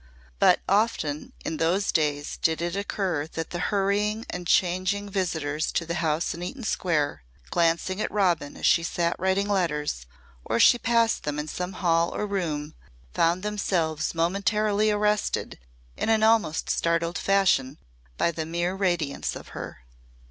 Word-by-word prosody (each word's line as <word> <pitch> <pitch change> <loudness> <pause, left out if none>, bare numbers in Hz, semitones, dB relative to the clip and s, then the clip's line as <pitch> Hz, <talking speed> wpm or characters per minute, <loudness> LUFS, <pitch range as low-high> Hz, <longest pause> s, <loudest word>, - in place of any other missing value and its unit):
But - - +5
often 195 -8 0
in 160 - -2
those 180 +6 +1
days 145 -2 0
did 160 0 +1
it 170 +1 -2
occur 190 -6 -2
that 165 0 -4
the 175 - -3
hurrying 205 +2 0
and 180 -1 -5
changing 185 +4 +1
visitors 160 -6 -1
to 170 - 0
the 170 - -3
house 160 0 0
in 170 - -8
Eaton 240 +9 -6
Square, 150 - 0 0.3
glancing 170 +4 +1
at - - -1
Robin 175 -8 0
as - - -4
she 165 - +5
sat 170 0 -1
writing 190 +2 +1
letters, 150 - -1 0.4
or 115 - -2
as 115 - +5
she 240 - +6
passed 230 -1 +2
them 150 0 -3
in 150 +1 -3
some 180 +4 -4
hall 170 -2 +1
or - - -1
room, 160 -7 -3 0.4
found 170 +3 +2
themselves 175 -7 -1
momentarily 205 +5 +1
arrested 210 - 0 0.4
in - - -2
an 220 -1 +3
almost 220 -8 +2
startled 170 +1 0
fashion 185 -9 +2 0.4
by 170 - +2
the 160 -1 -4
mere 175 +2 -1
radiance 175 -7 -1
of - - -10
her. - - -8
175 Hz, 155 wpm, -26 LUFS, 160-200 Hz, 0.4 s, she